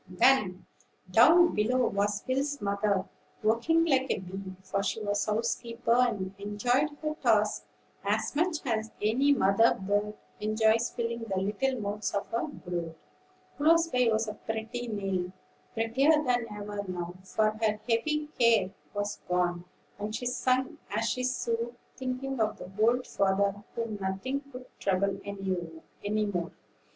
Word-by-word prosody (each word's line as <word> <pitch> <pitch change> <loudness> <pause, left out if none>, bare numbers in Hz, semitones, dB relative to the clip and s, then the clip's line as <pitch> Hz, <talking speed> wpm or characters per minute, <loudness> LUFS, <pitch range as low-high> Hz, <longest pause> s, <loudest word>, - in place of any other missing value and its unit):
Then, 190 -2 +3 0.5
down 330 - +7
below 245 +4 +2
was 200 0 0
Will's 280 +2 0
mother, 200 -1 0 0.4
working 240 +10 +3
like 270 -4 +2
a - - +1
bee; 190 +1 -7
for 195 +1 -1
she 200 +2 -1
was 205 -1 0
housekeeper, 230 +2 0
and 215 -6 +1
enjoyed 245 +8 +1
her 305 0 0
tasks 210 - +2 0.4
as 210 +7 0
much 320 -1 0
as 220 -3 -1
any 245 +7 +3
mother 225 -3 +4
bird 205 +2 0 0.2
enjoys 220 +2 +2
filling 235 -1 -3
the 195 -4 -2
little 215 +7 0
mouths 210 0 -2
of 200 - -1
her 230 +6 -1
brood. 175 - -5 0.6
Close 330 +3 +4
by 250 -5 +3
was 220 0 +1 0.2
pretty 225 +2 -3
Nell, 195 -4 -2 0.4
prettier 270 +8 +3
than 245 -3 +1
ever 205 0 -5
now; 175 -1 -4
for 215 +2 +1
her 215 -1 0
heavy 300 +6 +1
care 230 -5 +4 0.2
was 205 0 -2
gone, 175 -1 0 0.3
and 210 +1 -3
she 245 - -4
sung 255 +1 0
as 215 +3 -1
she 255 - -2
sewed, 240 -1 -1 0.2
thinking 260 0 -3
of 215 -1 +1
the 180 - -9
old 245 +3 +3
father, 200 +1 +1
whom 230 -3 -3
nothing 195 +9 -2
could 250 -1 -9
trouble 195 0 +1
any 195 +2 -3
more. 175 -4 -2
220 Hz, 140 wpm, -29 LUFS, 200-250 Hz, 0.6 s, down